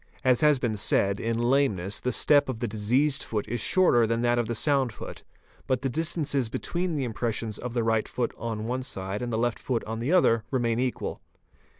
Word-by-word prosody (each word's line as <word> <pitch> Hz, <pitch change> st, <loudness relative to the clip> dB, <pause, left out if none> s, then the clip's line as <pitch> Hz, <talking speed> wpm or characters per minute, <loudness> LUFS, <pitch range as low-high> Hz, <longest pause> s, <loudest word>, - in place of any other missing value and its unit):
As 130 Hz, -2 st, +3 dB
has 150 Hz, -2 st, +5 dB
been 120 Hz, -4 st, -1 dB
said, 100 Hz, 0 st, +2 dB
in 115 Hz, 0 st, -1 dB
lameness, 120 Hz, -6 st, +1 dB
the 125 Hz, -, -1 dB
step 145 Hz, +3 st, +4 dB
of 120 Hz, -4 st, -4 dB
the 120 Hz, -, -2 dB
diseased 125 Hz, +7 st, +1 dB
foot 105 Hz, -2 st, -3 dB
is 120 Hz, +2 st, -2 dB
shorter 120 Hz, -11 st, +4 dB
than 115 Hz, +1 st, -1 dB
that 120 Hz, 0 st, +2 dB
of 120 Hz, -, -1 dB
the 115 Hz, -, -2 dB
sound 135 Hz, -1 st, +1 dB
foot, -, -, -9 dB, 0.5 s
but 130 Hz, 0 st, 0 dB
the 135 Hz, -, 0 dB
distances 150 Hz, -5 st, -1 dB
between 175 Hz, +7 st, -2 dB
the 140 Hz, -, -1 dB
impressions 115 Hz, -2 st, -3 dB
of 125 Hz, 0 st, -6 dB
the 120 Hz, -, +1 dB
right 110 Hz, -1 st, +1 dB
foot 120 Hz, -2 st, -2 dB
on 110 Hz, -2 st, -4 dB
one 125 Hz, +3 st, -2 dB
side 95 Hz, -4 st, -4 dB
and 120 Hz, -1 st, -3 dB
the 110 Hz, -, -1 dB
left 120 Hz, +1 st, 0 dB
foot 120 Hz, -3 st, -2 dB
on 110 Hz, +1 st, -5 dB
the 125 Hz, +7 st, -1 dB
other 115 Hz, -12 st, +4 dB
remain 120 Hz, -3 st, 0 dB
equal. 125 Hz, -1 st, -3 dB
120 Hz, 215 wpm, -27 LUFS, 110-135 Hz, 0.5 s, has